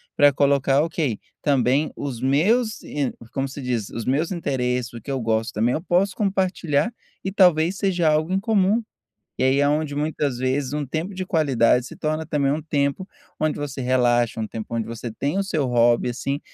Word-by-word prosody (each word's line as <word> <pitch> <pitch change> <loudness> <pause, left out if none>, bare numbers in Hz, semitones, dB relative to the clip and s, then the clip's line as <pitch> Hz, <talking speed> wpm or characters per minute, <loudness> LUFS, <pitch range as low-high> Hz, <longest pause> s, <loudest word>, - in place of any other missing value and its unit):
pra 145 0 +6
colocar, 140 0 +3
ok, 155 -8 -1 0.2
também 140 +1 +2
os 135 -5 -5
meus 210 - +2
e 145 -3 -2 0.2
como 135 0 -1
se 135 +2 -9
diz? 120 -5 -2
Os 115 -2 -5
meus 145 +7 0
interesses, 125 -7 -1
o 115 - -8
que 125 - -11
eu 135 -1 -1
gosto 115 0 -1
também 115 +4 +1
eu 155 - -2
posso 185 +2 +1
compartilhar 190 -2 0 0.3
e 190 - -2
talvez 180 -2 +4
seja 180 -5 +1
algo 155 +3 +1
em 190 - +2
comum. 210 +1 +2 0.6
E - - +1
aí 135 +2 +3
é 145 - +3
onde 150 0 0
muitas 145 -2 -1
vezes 130 +1 -1
um 150 -1 -1
tempo 165 +8 -3
de 185 0 -3
qualidade 130 -8 +2
se - - -10
torna 155 +1 -2
também 145 -3 +1
um 150 - -1
tempo 145 +4 -1 0.3
onde 155 -1 0
você 145 -2 -5
relaxa, 120 -2 +2
um 110 - -2
tempo 110 +1 -6
onde 115 -1 -1
você 115 +1 -6
tem 140 - -2
o 200 - +1
seu 155 -7 -1
hobby, 120 0 +3
assim, 135 +4 -3
145 Hz, 195 wpm, -23 LUFS, 125-165 Hz, 0.6 s, pra